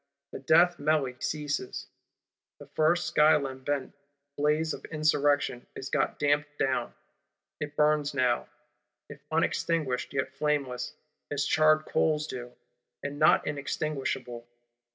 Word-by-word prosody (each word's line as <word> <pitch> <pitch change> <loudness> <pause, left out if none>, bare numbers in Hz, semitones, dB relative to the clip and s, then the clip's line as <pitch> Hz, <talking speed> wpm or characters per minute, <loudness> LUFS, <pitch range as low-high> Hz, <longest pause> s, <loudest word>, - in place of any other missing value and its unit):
The - - -6
death 170 +6 +4
melly 145 -3 +1
ceases: 145 -4 -3 0.7
the - - -12
first 160 +2 +1
sky 155 0 +5
lambent 135 0 -3 0.4
blaze 150 +2 +1
of - - -8
Insurrection 145 -4 +1
is 135 - -6
got - - 0
damped 145 0 0
down; 130 -3 -1 0.6
it 145 0 -5
burns 150 -1 +2
now, 125 -3 +1 0.6
if 145 0 -11
unextinguished, 160 -4 0
yet 135 -1 -2
flameless, 140 -3 -2 0.3
as 145 -1 -1
charred 155 0 +4
coals 150 -1 +1
do, 125 -4 -7 0.5
and 145 +1 -5
not 155 - +5
inextinguishable. 135 -4 -3
145 Hz, 115 wpm, -28 LUFS, 135-155 Hz, 0.7 s, sky